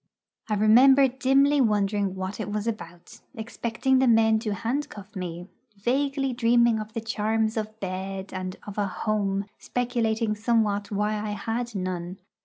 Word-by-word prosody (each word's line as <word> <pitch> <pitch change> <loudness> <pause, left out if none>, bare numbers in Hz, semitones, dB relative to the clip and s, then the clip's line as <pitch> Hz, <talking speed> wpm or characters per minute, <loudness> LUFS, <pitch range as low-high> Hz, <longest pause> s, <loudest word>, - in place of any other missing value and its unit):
I 210 - +1
remember 260 +6 +6
dimly 275 +2 +3
wondering 205 -3 +1
what 190 +2 -5
it 210 - -4
was 210 0 -2
about, 175 -6 -7
expecting 235 +3 0
the 265 - +3
men 220 -1 +4
to 215 -2 -2
handcuff 230 -3 -4
me, 175 -1 -5 0.3
vaguely 270 +4 0
dreaming 235 -1 +3
of 215 0 -7
the 230 - -3
charms 220 0 0
of 215 0 -4
bed 190 0 -5
and 185 -1 -4
of 205 0 -6
a 205 - +1
'home,' 200 0 -1
speculating 230 -3 -1
somewhat 210 -2 0
why 210 +1 -1
I 210 0 -3
had 230 +2 -3
none. 185 -1 -4
215 Hz, 150 wpm, -26 LUFS, 200-235 Hz, 0.3 s, remember